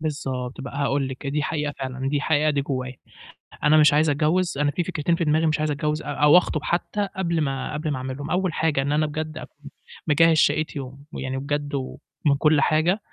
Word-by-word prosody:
بالضبط 135 -5 -4
بقى 140 0 -7
هاقول 140 -1 0
لِك، 130 +2 -7
دي 145 +2 -1
حقيقة 150 -1 -2
فعلًا، 130 0 -3
دي 145 - 0
الحقيقة 155 +1 +2
دي 145 -1 0
جوّايا. 130 -2 -4 0.7
أنا 150 +1 +5
مش 150 -1 +6
عايز 150 +1 +3
أتجوّز، 160 +3 +1
أنا 145 0 +2
في 170 +5 -2
فكرتين 165 -1 -1
في 170 - -1
دماغي 155 +1 +2
مش 155 - +1
عايز 155 0 0
أتجوّز 150 +1 -1
أ - - -15
أو 145 +2 +4
أخطب 155 -4 -1
حتّى 200 +5 -1
قبل 170 -3 0
ما، 135 -2 -2
قبل 150 +1 -3
ما 145 - -1
أعملهم. 130 +2 -5
أول 185 -1 0
حاجة 155 -3 +1
إن 140 +1 -1
أنا 155 +1 +2
بجد 155 +1 -5
أكون 145 -1 -12 0.4
مجهّز 165 +1 +4
شقتي 150 0 +1
ومن 130 0 -9
ويعني 130 0 -4
بجد 145 +1 -3
ومن 140 +2 -2
كل 150 0 +4
حاجة، 155 +5 +3
إن 200 - -3
150 Hz, 215 wpm, -24 LUFS, 140-155 Hz, 0.7 s, مش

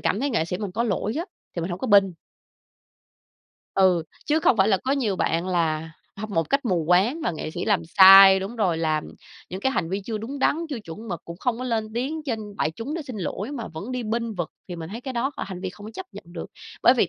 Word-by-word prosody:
cảm 210 - 0
thấy 285 - 0
nghệ 225 -10 +1
sĩ 180 +2 -4
mình 205 -3 -4
có 230 +5 0
lỗi 215 -1 -1
á, 335 - -2 0.3
thì - - 0
mình 175 - -3
hổng 175 - -4
có 260 - -3
bênh. 200 -3 +7 1.7
Ừ, 185 -3 +4 0.2
chứ 305 +2 +2
không 250 - +4
phải 195 +1 +4
là 195 -3 +3
có 265 - +1
nhiều 230 -9 0
bạn 170 0 0
là 160 -3 0 0.3
hâm 215 +2 -5
mộ - - -6
một 165 0 0
cách 275 0 +2
mù 180 -8 +1
quáng 195 - +3
và - - +1
nghệ 155 -1 -5
sĩ - - -4
làm 200 -6 +2 0.2
sai 195 0 +10
đúng 200 +5 -5
rồi, 180 -7 +1
làm 155 -2 0 0.5
những 185 +2 -5
cái 265 - +1
hành 170 -9 -1
vi 195 +2 -1
chưa 220 0 -3
đúng 260 +6 -6
đắn, 285 - +3
chưa 275 -6 -4
chuẩn 210 +4 -9
mực 175 -4 -4
cũng 170 - -8
không 230 +5 -1
có 255 - -4
lên 225 -3 -1
tiếng 280 +7 -2
trên 220 -7 -5
đại 155 - 0
chúng 230 - -6
để 335 - -3
xin 255 -5 -8
lỗi 200 +5 -4
mà 235 -5 -5
vẫn 195 +10 -7
đi 250 -1 -2
bênh 230 0 -2
vực 175 -4 -3 0.2
thì 175 - -5
mình 165 -1 -6
thấy 225 +4 -6
cái 265 +1 -5
đó 255 +3 0
h - - -5
hành 185 -2 -5
vi 190 - -3
không 205 +3 -12
có - - -7
chấp 375 - -6
nhận - - -10
được. 175 - -6 0.4
Bởi 245 - +7
vì 210 -8 +2
205 Hz, 270 wpm, -24 LUFS, 180-240 Hz, 1.7 s, sai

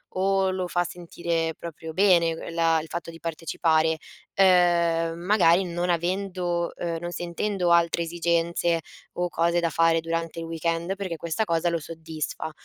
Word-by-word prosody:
o 195 0 +2
lo 185 -1 -2
fa 175 0 +1
sentire 170 -2 -3
proprio 160 -1 -8
bene 175 -3 +4
l 165 +1 -7
la 165 -1 +3
il 160 - -10
fatto 170 0 -5
di 165 0 -10
partecipare, 160 -1 +1 0.4
ehm, 170 -3 +3
magari 180 -1 +4
non 175 0 -2
avendo, 175 0 -1
ehm 170 -1 -3
non 175 +1 -5
sentendo 175 +1 -1
altre 170 0 +3
esigenze 170 0 0 0.3
o 175 0 -1
cose 170 +1 +1
da 170 - +1
fare 165 +1 +3
durante 165 0 -3
il 165 - -5
weekend, 165 +2 -2
perché 190 -4 -4
questa 170 +7 -2
cosa 170 -1 +1
lo 170 -1 -1
soddisfa. 160 0 -5
170 Hz, 155 wpm, -25 LUFS, 165-175 Hz, 0.4 s, bene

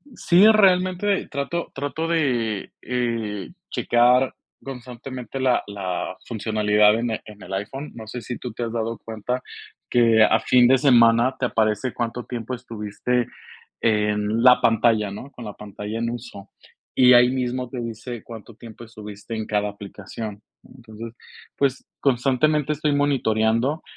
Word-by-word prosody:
Sí, 180 0 +5
realmente 190 -1 +3
trato 145 +5 -3
trato 145 +4 -3
de, 125 -11 0
eh, 115 -5 -2 0.2
checar 125 +2 +3 0.3
constantemente 125 -1 -8
la 130 -2 +2
la 95 -3 -4
funcionalidad 105 -1 +3
en 120 -1 -1
el 110 - -3
en 105 -2 -13
el 95 - -8
iPhone. 135 +9 -5
No 110 -2 -8
sé 120 +3 -6
si 120 +2 -6
tú 125 - -6
te 120 - -4
has 115 - -3
dado 115 -1 -2
cuenta 115 +3 -4 0.5
que 115 -2 +4
a 110 - +4
fin 125 -1 +4
de 130 - +5
semana 120 -2 +5
te 130 - +1
aparece 110 +1 0
cuánto 120 0 -3
tiempo 120 0 -5
estuviste 115 +1 -2 0.5
en 105 0 +1
la 125 -1 +7
pantalla, 115 -2 +3
¿no? 130 +7 -9
Con 120 - -10
la 105 - -6
pantalla 105 +2 -7
en 115 0 -1
uso. 120 -4 -8 0.5
Y 125 -1 +7
ahí 125 0 +7
mismo 125 -1 -2
te 125 - -6
dice 115 +1 -6
cuánto 115 -1 -11
tiempo 115 -1 -12
estuviste 105 -1 -9
en 110 - -3
cada 105 -1 0
aplicación. 100 +1 -8 0.2
Entonces, 115 -2 -11 0.4
pues, 135 -2 0
constantemente 140 +3 +2
estoy 150 0 0
monitoreando. 130 0 +1
120 Hz, 150 wpm, -23 LUFS, 110-130 Hz, 0.5 s, la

